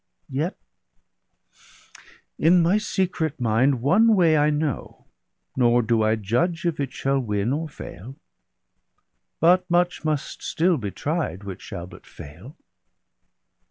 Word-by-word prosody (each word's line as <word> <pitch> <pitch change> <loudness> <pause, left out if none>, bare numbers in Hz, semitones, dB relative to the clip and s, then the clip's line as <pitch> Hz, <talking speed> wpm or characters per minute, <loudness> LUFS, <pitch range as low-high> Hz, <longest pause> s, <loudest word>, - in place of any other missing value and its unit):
Yet 150 +7 -2 1.8
in 170 +2 +5
my 185 +6 +3
secret 180 -8 -2
mind 120 +2 +1
one 215 - +4
way 170 -4 +4
I 150 0 +3
know, 150 -2 -3 0.5
Nor 120 -1 +3
do 115 0 +1
I 110 +1 +2
judge 165 - -1
if 170 -3 -1
it 135 -2 -2
shall 135 +1 -1
win 105 0 -1
or 160 +2 -3
fail; 130 -2 -10 1.2
But 180 +3 +3
much 175 0 +1
must 155 -2 -3
still 170 +1 +1
be 105 -5 -4
tried, 150 - -3
which 95 -2 -8
shall 95 -6 -7
but 90 - -15
fail.' 90 - -12
145 Hz, 125 wpm, -23 LUFS, 115-170 Hz, 1.8 s, in